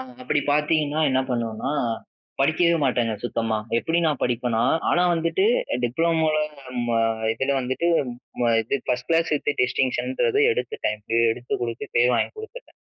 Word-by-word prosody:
அ - - -4 0.2
அப்பிடி 145 +3 +1
பாத்தீங்கன்னா 150 0 +1
என்ன 130 0 +2
பண்ணுவனா, 115 +2 -2 0.7
படிக்கவே 170 +4 +3
மாட்டேங்க 120 -3 +1
சுத்தமா. 115 -2 -1 0.2
எப்படி 165 +6 0
நான் 150 -4 0
படிப்பேனா 120 -2 0 0.3
ஆனா 175 - +3
வந்துட்டு 165 - 0 0.4
டிப்ளமோல 160 +4 +1 0.5
ம 115 -1 +1 0.3
இதுல 135 +4 -1
வந்துட்டு 130 +6 -2 0.5
ம 120 - +3
இது 115 - -1
1 125 0 -1
கிளாஸ் 165 -1 +2 0.3
டிஸ்டிங்ஷன்றது 260 - 0
எடுத்துட்டேன். 440 - -3 0.3
எடுத்து 120 +2 -3
குடுத்து 115 0 -4
பேர் 125 +1 +4
வாங்கி - - +1
குடுத்துட்டேன். 470 +3 -10
135 Hz, 130 wpm, -23 LUFS, 120-165 Hz, 0.7 s, பேர்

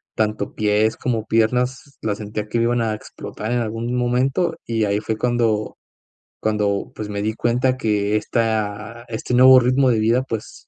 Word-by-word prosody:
tanto 110 -1 -1
pies 105 +1 +1
como 115 -4 -2
piernas 125 +4 0
la 110 - -1
sentía 105 0 -5
que 115 +2 -1
me 115 - +2
iban 120 0 +1
a 110 -1 0
explotar 110 +1 -7
en 120 - +1
algún 115 +1 -3
momento, 130 +7 +1
y 115 -2 0
ahí 100 +1 0
fue 110 0 -3
cuando 115 -3 0 0.6
cuando 105 -2 -1
pues, 105 - -5
me 100 -1 -4
di 110 +1 -1
cuenta 125 +3 +1
que 105 -3 0
esta 110 0 -2
este 115 +2 -4
nuevo 130 +1 +8
ritmo 130 +2 +3
de 115 -3 +2
vida 115 +4 +2
pues, 115 -4 -7
115 Hz, 175 wpm, -21 LUFS, 105-125 Hz, 0.6 s, nuevo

